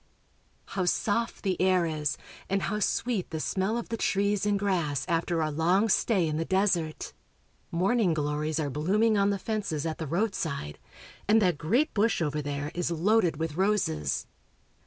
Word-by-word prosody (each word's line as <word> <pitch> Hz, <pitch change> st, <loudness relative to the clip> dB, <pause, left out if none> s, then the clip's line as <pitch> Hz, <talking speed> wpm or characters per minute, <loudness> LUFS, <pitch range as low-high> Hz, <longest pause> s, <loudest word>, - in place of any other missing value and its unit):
How 185 Hz, -2 st, -1 dB
soft 225 Hz, +6 st, 0 dB
the 185 Hz, -4 st, -1 dB
air 185 Hz, -2 st, +3 dB
is, 155 Hz, -3 st, -2 dB, 0.3 s
and 195 Hz, 0 st, 0 dB
how 210 Hz, +1 st, -1 dB
sweet 215 Hz, -1 st, -1 dB
the 160 Hz, -, -4 dB
smell 190 Hz, +7 st, -1 dB
of 235 Hz, -, -5 dB
the 230 Hz, -, -2 dB
trees 205 Hz, 0 st, +1 dB
and 205 Hz, -1 st, +2 dB
grass 175 Hz, -9 st, 0 dB
after 170 Hz, -1 st, 0 dB
our 155 Hz, -, -1 dB
long 180 Hz, +8 st, +2 dB
stay 190 Hz, -4 st, +2 dB
in 155 Hz, -1 st, -2 dB
the 165 Hz, -, 0 dB
desert! 185 Hz, -4 st, 0 dB, 0.6 s
Morn 190 Hz, +8 st, +1 dB
ing 180 Hz, -7 st, +2 dB
glories 150 Hz, +1 st, -1 dB
are 145 Hz, -3 st, -1 dB
blooming 205 Hz, -, +2 dB
on 200 Hz, 0 st, +3 dB
the 200 Hz, -, 0 dB
fences 195 Hz, -8 st, -3 dB
at 160 Hz, -1 st, -3 dB
the 160 Hz, -, -4 dB
roadside, 165 Hz, -, -2 dB, 0.5 s
and 215 Hz, +2 st, +5 dB
that 180 Hz, -7 st, +1 dB
great 245 Hz, -, +1 dB
bush 215 Hz, 0 st, +2 dB
over 150 Hz, -2 st, -1 dB
there 145 Hz, +1 st, -4 dB
is 175 Hz, -1 st, -1 dB
loaded 175 Hz, 0 st, +2 dB
with 160 Hz, -1 st, -3 dB
roses. 185 Hz, -, 0 dB
180 Hz, 175 wpm, -28 LUFS, 155-205 Hz, 0.6 s, and